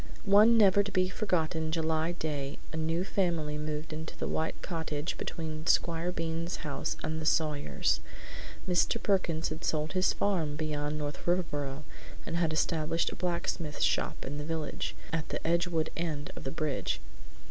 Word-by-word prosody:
One 210 +3 +7
never 200 -2 +7
to 200 0 -3
be 185 -1 +2
forgotten 160 -5 0
July 160 +1 +1
day 145 -4 -3 0.2
a - - -3
new 160 +2 0
family 170 -6 0
moved 150 +1 -3
into 160 +1 -6
the - - -2
white 160 - -1
cottage 160 -3 -2
between 155 -1 -4
Squire 170 +1 +3
Bean's 165 0 -2
house 140 -2 -2
and 160 0 -2
the - - -4
Sawyers'. 150 -3 +2 0.7
Mr. 180 +5 +3
Perkins 170 -6 +1
had 155 +1 -6
sold 155 0 0
his 185 0 +4
farm 165 -8 +1
beyond 150 -1 -1
North 145 +1 -4
Riverboro 150 -5 0 0.4
and 165 - -3
had 170 -2 +2
established 160 +1 +1
a - - -6
blacksmith's 170 -3 -1
shop - - +1
in 145 +2 -4
the - - -3
village, 160 -1 -3 0.2
at 160 -2 -1
the - - -4
Edgewood 170 -1 +1
end 155 -4 -2
of - - -8
the - - 0
bridge. 155 -3 -1
160 Hz, 160 wpm, -31 LUFS, 155-175 Hz, 0.7 s, One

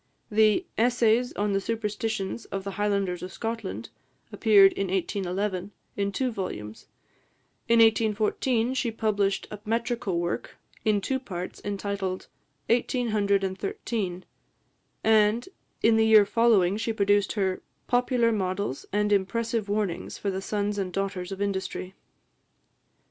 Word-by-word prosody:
The 215 - +4
"Essays 240 0 +3
on 205 0 -1
the 195 - +1
Superstitions 220 -1 -3
of 195 -1 -5
the 200 - -4
Highlanders 200 -3 -1
of 185 - -6
Scotland" 225 -1 -5 0.4
appeared 200 -3 +6
in 195 - -2
1811, 190 +1 -2 0.3
in 200 0 -1
two 255 +4 -1
volumes; 110 - -6 0.8
in 235 - +5
1814, 225 +2 +2
she 255 -2 0
published 205 -3 0
a 210 - -6
metrical 225 -4 -1
work, 175 0 -3 0.3
in 210 -2 +2
two 265 +6 -1
parts, 185 -8 -6
entitled 200 -2 -3 0.4
"Eighteen 245 +1 +1
Hundred 200 -2 +2
and 190 0 -3
Thirteen;" 210 - -3 0.8
and, 220 +1 +3 0.4
in 225 0 +5
the 220 0 +4
year 215 -2 +7
following, 205 -4 +3
she 225 +1 -1
produced 205 -1 +2
her 190 -3 -1 0.2
"Popular 245 -1 +2
Models 185 - -2
and 210 +1 +1
Impressive 220 +2 0
Warnings 200 -4 -2
for 200 - -2
the 190 0 -3
Sons 205 0 -2
and 185 -2 -2
Daughters 195 -1 -3
of 195 +1 -2
Industry." 190 -1 -3
205 Hz, 130 wpm, -27 LUFS, 195-225 Hz, 0.8 s, year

